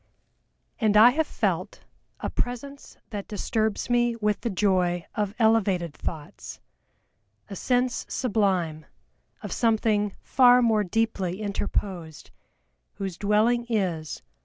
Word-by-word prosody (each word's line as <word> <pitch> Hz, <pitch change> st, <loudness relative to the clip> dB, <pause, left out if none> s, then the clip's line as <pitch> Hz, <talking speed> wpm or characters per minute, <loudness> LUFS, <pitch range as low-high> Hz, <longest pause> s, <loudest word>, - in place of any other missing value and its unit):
"And 215 Hz, -2 st, +3 dB
I 230 Hz, +3 st, +9 dB
have 310 Hz, +3 st, 0 dB
felt -, -, -2 dB, 0.4 s
A -, -, -3 dB
Presence 275 Hz, +3 st, -5 dB
that 205 Hz, -2 st, -5 dB
disturbs 220 Hz, 0 st, -1 dB
me 240 Hz, -1 st, +2 dB
with 210 Hz, -2 st, -1 dB
the 235 Hz, -, -2 dB
joy 180 Hz, -3 st, +1 dB
Of 210 Hz, -2 st, -2 dB
elevated 200 Hz, -8 st, +2 dB
thoughts, 150 Hz, -1 st, -7 dB, 0.9 s
a -, -, -5 dB
sense 250 Hz, +4 st, 0 dB
sublime 190 Hz, -, 0 dB, 0.6 s
Of -, -, -6 dB
something 215 Hz, -3 st, +1 dB
far 250 Hz, -1 st, +5 dB
more 220 Hz, -2 st, +3 dB
deeply 195 Hz, -2 st, -1 dB
interposed, 195 Hz, -6 st, -4 dB, 0.6 s
Whose 195 Hz, -3 st, -5 dB
dwelling 220 Hz, +4 st, +2 dB
is 175 Hz, -, -2 dB
210 Hz, 110 wpm, -26 LUFS, 190-235 Hz, 0.9 s, I